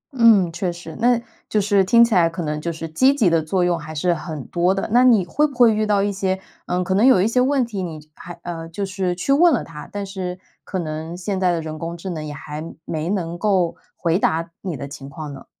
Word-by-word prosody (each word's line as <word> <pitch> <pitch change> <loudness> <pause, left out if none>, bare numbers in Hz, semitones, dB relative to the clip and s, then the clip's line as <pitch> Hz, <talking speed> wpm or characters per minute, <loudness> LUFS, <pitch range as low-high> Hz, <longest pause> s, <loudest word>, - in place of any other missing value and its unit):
嗯， 215 -8 +5
确 180 +1 -2
实， 170 -2 -9
那 240 0 +3 0.3
就 215 - +2
是 200 -1 +3
听 235 +5 +6
起 230 - -2
来 170 -3 +4
可 170 +1 -5
能 150 0 -3
就 170 +2 -2
是 165 0 -6
积 260 - +3
极 205 -11 +3
的 165 - +3
作 175 +4 0
用 175 -1 +1
还 155 +1 -8
是 175 +4 +1
很 155 -4 -6
多 180 +2 +1
的。 195 - -2
那 250 +1 +6
你 225 -7 +5
会 295 - +2
不 285 - -12
会 240 -3 +6
遇 215 0 0
到 200 -1 +2
一 205 - 0
些， 190 -1 -1 0.3
嗯 180 +1 0
可 190 - -1
能 200 +4 +3
有 225 -8 +6
一 195 - +3
些 250 +2 +2
问 265 -1 +2
题， 210 -5 -5
你 165 -4 -5
就 150 - -18
还 175 - -10
呃， 165 -1 -6
就 200 +4 -3
是 185 -2 -2
去 185 +10 +1
问 340 +4 +6
了 250 - +1
它， 150 -2 -10
但 205 -1 -4
是 185 -2 -5 0.2
可 190 - -4
能 160 0 -4
现 190 +1 -3
在 185 -1 +3
的 170 - -1
人 155 -1 -6
工 170 +1 -5
智 185 +2 -6
能 155 -3 -4
也 150 - -6
还 150 +2 -7 0.2
没 160 +1 -3
能 175 -3 -2
够 185 -5 +1 0.2
回 170 +2 +1
答 165 -1 0
你 180 -6 -4
的 140 - -6
情 140 -1 -9
况 150 0 -7
呢？ 135 - -11
180 Hz, 280 characters per minute, -21 LUFS, 165-205 Hz, 0.3 s, 听